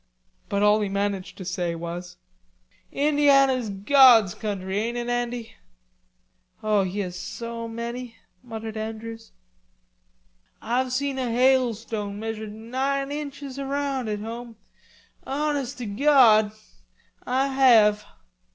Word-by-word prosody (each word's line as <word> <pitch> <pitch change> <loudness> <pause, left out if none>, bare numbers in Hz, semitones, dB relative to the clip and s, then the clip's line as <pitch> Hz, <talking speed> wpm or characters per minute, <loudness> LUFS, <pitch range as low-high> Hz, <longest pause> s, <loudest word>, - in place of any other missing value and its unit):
But 200 0 0
all 210 +1 +4
he 205 - -1
managed 200 -1 -2
to 185 - -8
say 175 -2 -2
was: 175 +1 -7 0.7
"Indiana's 275 -4 +3
God's 225 -1 +6
country, 195 -2 -3
ain't 235 +3 -2
it, 240 0 -3
Andy?" 240 -1 -3 1.1
"Oh, 215 -1 +3
he 190 +2 -2
has 180 -2 -5
so 230 +4 -6
many," 235 +1 -6 0.3
muttered 225 -2 -7
Andrews. 225 +1 -7 1.3
"Ah've 250 +3 -1
seen 270 +1 -1
a 255 -2 -1
hailstone 230 -4 +1
measured 220 -1 -5
nine 265 +5 -2
inches 285 -2 -6
around 275 -3 -2
out 210 - -2
home, 230 +1 -7 0.7
honest 280 -2 -2
to 245 - -5
Gawd, 220 -2 +5 0.8
Ah 265 +2 +1
have." 225 -6 +5
230 Hz, 115 wpm, -25 LUFS, 210-265 Hz, 1.3 s, God's